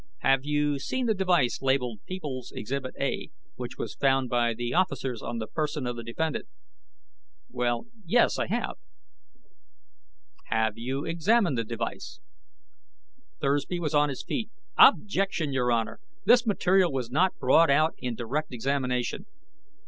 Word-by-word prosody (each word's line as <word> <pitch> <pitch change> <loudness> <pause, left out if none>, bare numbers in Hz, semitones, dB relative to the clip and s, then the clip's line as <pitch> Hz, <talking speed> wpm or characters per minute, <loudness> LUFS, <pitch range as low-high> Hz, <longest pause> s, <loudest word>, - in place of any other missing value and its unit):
"Have 135 0 +3
you 145 -1 +1
seen 255 - -2
the 225 - +3
device 180 - +1
labeled 130 -5 0
People's 145 -9 -5
Exhibit 130 +3 -4
A, - - -2 0.2
which - - -7
was - - -4
found 135 -2 +2
by 120 -1 +2
the 120 +1 -3
officers 135 -9 0
on 120 - -4
the 110 - -3
person 150 +2 -2
of 120 0 -2
the 120 - -6
defendant?" 150 +7 -3 1.0
"Well... 120 - -1 0.2
yes. 170 - +3
I - - 0
have." - - -2 1.7
"Have 110 -1 +1
you 130 +5 -3
examined 175 - +2
this 115 - -3
device?" 115 - -5 1.2
Thursby 145 +5 0
was 160 -2 -2
on 150 0 +4
his 135 - -5
feet. 225 -5 -3 0.3
"Objection, 195 - +4
Your 125 -2 +1
Honor! 115 -1 -1 0.3
This 245 -1 +5
material 190 -3 +3
was 125 -3 -3
not 180 +7 +2
brought 150 +5 +5
out 155 +3 +4
in 125 -2 -3
direct 130 +7 -3
examination!" 125 0 -1
140 Hz, 140 wpm, -27 LUFS, 125-165 Hz, 1.7 s, This